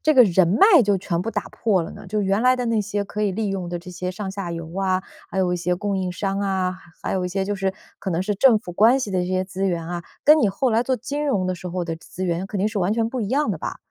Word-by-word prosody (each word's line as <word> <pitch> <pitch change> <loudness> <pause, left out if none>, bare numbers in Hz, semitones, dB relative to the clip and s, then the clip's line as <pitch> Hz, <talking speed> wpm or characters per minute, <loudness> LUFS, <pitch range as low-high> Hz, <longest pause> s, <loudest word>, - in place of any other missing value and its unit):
这 310 - +4
个 255 -4 +8
人 185 -3 +4
脉 330 - +6
就 200 -2 +2
全 170 -2 -2
部 225 - -3
打 205 -2 -2
破 200 -6 +1
了 165 - -6
呢？ - - -11
就 215 - 0
原 195 +2 +1
来 255 0 +5
的 250 -1 -2
那 230 -2 +2
些 205 0 -2
可 210 +1 -4
以 205 - +2
利 215 +3 -2
用 190 -3 -3
的 175 0 -3
这 175 +2 -12
些 180 +1 -3
上 195 +2 -5
下 190 -2 -4
游 165 0 -6
啊， 190 -1 +1 0.3
还 190 - -3
有 185 -1 +2
一 - - 0
些 180 +1 -1
供 200 +1 -2
应 185 -1 -1
商 195 +2 -2
啊， 190 -2 0 0.2
还 - - -3
有 185 -1 0
一 180 - -1
些 190 +1 -1
就 205 +1 -2
是 195 -1 -1 0.3
可 190 - -3
能 170 - 0
是 205 +3 -1
政 230 +2 +5
府 180 - -9
关 225 +8 +5
系 215 -6 -3
的 185 - +1
这 180 - -1
些 185 0 0
资 190 +1 -4
源 170 -2 -2
啊， 175 0 -4 0.2
跟 305 +1 +7
你 220 - +4
后 240 +7 0
来 225 +1 +3
做 260 +1 0
金 290 +3 -3
融 205 -11 +1
的 185 - -1
时 180 0 -7
候 180 0 -2
的 165 -1 -3
资 170 +3 -7
源 175 0 -1
肯 205 - -3
定 195 - +2
是 210 -2 -2
完 185 +3 +1
全 225 0 +1
不 255 +1 -3
一 205 - -2
样 270 0 +1
的 - - -3
吧？ - - -4
195 Hz, 335 characters per minute, -23 LUFS, 180-215 Hz, 0.3 s, 个